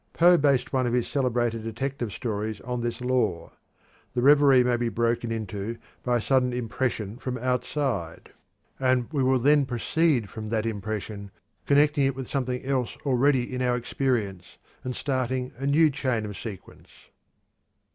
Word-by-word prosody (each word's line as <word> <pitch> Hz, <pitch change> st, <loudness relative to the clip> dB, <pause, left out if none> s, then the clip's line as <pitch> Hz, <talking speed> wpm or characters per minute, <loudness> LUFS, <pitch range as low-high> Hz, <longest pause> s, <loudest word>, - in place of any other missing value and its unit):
Poe 175 Hz, +1 st, +6 dB
based 140 Hz, -5 st, +2 dB
one 130 Hz, -2 st, +2 dB
of 120 Hz, -, -1 dB
his 125 Hz, -1 st, +1 dB
celebrated 120 Hz, -4 st, 0 dB
detective 120 Hz, +1 st, -4 dB
stories 110 Hz, -1 st, -3 dB
on 125 Hz, 0 st, -3 dB
this 120 Hz, +1 st, -3 dB
law. 125 Hz, -9 st, 0 dB, 0.6 s
The 120 Hz, -, +1 dB
reverie 140 Hz, -2 st, +6 dB
may 125 Hz, 0 st, +2 dB
be 120 Hz, 0 st, -1 dB
broken 115 Hz, 0 st, 0 dB
into 110 Hz, 0 st, -4 dB, 0.2 s
by 125 Hz, -1 st, +1 dB
a -, -, -2 dB
sudden 125 Hz, 0 st, +2 dB
impression 115 Hz, -3 st, -2 dB
from 130 Hz, -2 st, -4 dB
outside, 125 Hz, -, -2 dB, 0.5 s
and 130 Hz, -2 st, +2 dB
we 140 Hz, -, +1 dB
will 130 Hz, 0 st, +3 dB
then 145 Hz, +3 st, +4 dB
proceed 130 Hz, 0 st, +1 dB
from 110 Hz, +1 st, -7 dB
that 110 Hz, -1 st, 0 dB
impression, 105 Hz, -1 st, -4 dB, 0.4 s
connecting 145 Hz, 0 st, +4 dB
it 135 Hz, -, -1 dB
with 130 Hz, -2 st, -6 dB
something 125 Hz, -2 st, -2 dB
else 130 Hz, -3 st, -1 dB
already 130 Hz, -1 st, +2 dB
in 125 Hz, -, -2 dB
our 125 Hz, -1 st, +2 dB
experience, 110 Hz, -8 st, -2 dB, 0.3 s
and 125 Hz, -1 st, -4 dB
starting 130 Hz, -2 st, -2 dB
a 135 Hz, +2 st, -3 dB
new 155 Hz, +2 st, +4 dB
chain 130 Hz, -6 st, -1 dB
of 105 Hz, -1 st, -6 dB
sequence. 100 Hz, -1 st, -9 dB
125 Hz, 155 wpm, -26 LUFS, 115-135 Hz, 0.6 s, Poe